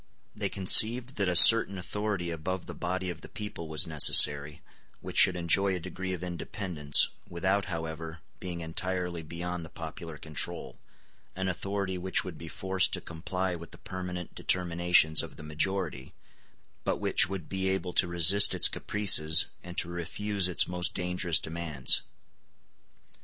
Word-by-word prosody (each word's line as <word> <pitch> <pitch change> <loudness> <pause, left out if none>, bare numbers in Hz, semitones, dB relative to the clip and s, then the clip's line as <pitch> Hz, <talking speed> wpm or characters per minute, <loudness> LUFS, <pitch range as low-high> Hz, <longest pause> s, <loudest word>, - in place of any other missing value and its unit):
They 105 -2 -4
conceived 115 +7 +5
that 100 -3 -1
a 90 - -2
certain 100 +1 +7
authority 95 -1 -4
above 85 +3 -5
the - - -9
body 90 +1 -4
of 85 - -11
the - - -12
people 105 -6 -8
was 80 -1 +1
necessary, 75 -2 +4 0.4
which - - -10
should 95 - +5
enjoy 95 +3 0
a - - -5
degree 95 +2 -7
of 90 -1 -6
independence, 85 -4 +1 0.2
without, 95 +3 -2
however, 80 -2 -7 0.2
being 90 -2 -7
entirely 90 +1 -4
beyond 85 +2 -7
the 80 - -11
popular 80 0 -10
control; 75 -1 -4 0.6
an 95 0 -4
authority 95 0 -4
which 95 +1 -1
would 90 -4 -10
be 85 - -10
forced 95 +3 -1
to - - 0
comply 90 +2 -5
with 85 +1 -11
the - - -14
permanent 90 -2 -8
determinations 85 -3 +2
of - - -10
the - - -13
majority, 75 -2 -4 0.7
but - - -2
which 95 - +1
would 95 -5 -7
be 95 0 -4
able 95 -2 -4
to 90 - +3
resist 85 +4 +5
its - - +6
caprices, 80 -7 +3 0.2
and 90 0 -11
to - - +1
refuse 95 +3 -2
its 85 - +3
most 90 -1 -3
dangerous 90 -2 0
demands. 80 -5 -1
90 Hz, 155 wpm, -28 LUFS, 80-95 Hz, 0.7 s, certain